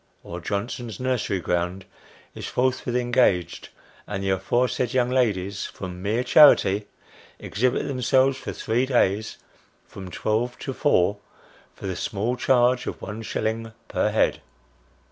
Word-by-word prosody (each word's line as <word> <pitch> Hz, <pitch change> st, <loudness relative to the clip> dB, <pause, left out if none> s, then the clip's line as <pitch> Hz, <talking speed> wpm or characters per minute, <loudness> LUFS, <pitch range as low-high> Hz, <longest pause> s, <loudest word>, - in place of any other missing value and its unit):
or 85 Hz, -, -7 dB
Johnson's 110 Hz, +4 st, -4 dB
nursery 125 Hz, -6 st, -1 dB
ground, 90 Hz, +2 st, -2 dB, 0.5 s
is -, -, -7 dB
forthwith 125 Hz, -1 st, 0 dB
engaged, 120 Hz, -8 st, +1 dB, 0.4 s
and 100 Hz, -1 st, -4 dB
the 95 Hz, -, 0 dB
aforesaid 120 Hz, +5 st, 0 dB
young 125 Hz, -1 st, +2 dB
ladies, 105 Hz, -7 st, 0 dB
from 90 Hz, -1 st, -8 dB
mere 110 Hz, +5 st, 0 dB
charity, 105 Hz, -7 st, +6 dB, 0.5 s
exhibit 125 Hz, +5 st, -1 dB
themselves 130 Hz, 0 st, +2 dB
for 135 Hz, -, -6 dB
three 120 Hz, +4 st, -1 dB
days, 110 Hz, -4 st, +1 dB, 0.5 s
from 95 Hz, -1 st, -10 dB
twelve 115 Hz, +6 st, -1 dB
to 135 Hz, -, -5 dB
four, 105 Hz, -, +2 dB, 0.6 s
for -, -, -10 dB
the 95 Hz, -1 st, -2 dB
small 110 Hz, +7 st, -2 dB
charge 125 Hz, 0 st, +2 dB
of -, -, -4 dB
one 105 Hz, +3 st, -6 dB
shilling 110 Hz, 0 st, -3 dB
per -, -, 0 dB
head -, -, +1 dB
115 Hz, 130 wpm, -24 LUFS, 95-125 Hz, 0.6 s, charity